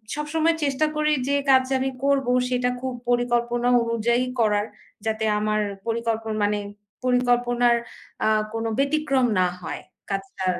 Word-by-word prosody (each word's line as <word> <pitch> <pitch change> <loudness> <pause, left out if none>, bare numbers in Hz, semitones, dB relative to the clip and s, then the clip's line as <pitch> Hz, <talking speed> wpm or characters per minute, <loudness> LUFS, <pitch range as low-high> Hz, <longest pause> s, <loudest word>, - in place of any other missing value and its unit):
সবসময় 315 +2 +1
চেষ্টা 280 +2 +1
করি 305 0 +1 0.2
যে 280 - +1 0.2
কাজ 260 -1 +6
আমি 265 +1 0
করব, 275 -2 +2 0.2
সেটা 250 0 +1
খুব 260 -1 -3 0.2
পরিকল্পনা 240 0 +1 0.2
অনুযায়ী 235 +1 +1 0.2
করার, 210 -2 +2 0.4
যাতে 220 0 -1 0.2
আমার 215 0 0 0.3
পরিকল্পন 225 -1 -1
মানে 205 0 +1 0.5
পরিকল্পনার 245 -1 +3 0.5
আ - - +3 0.3
কোনো 225 0 -2
ব্যতিক্রম 280 -2 +2
না 180 - +4
হয় 165 - -5 0.3
কাজটার 195 -1 -2
240 Hz, 130 wpm, -24 LUFS, 220-265 Hz, 0.5 s, কাজ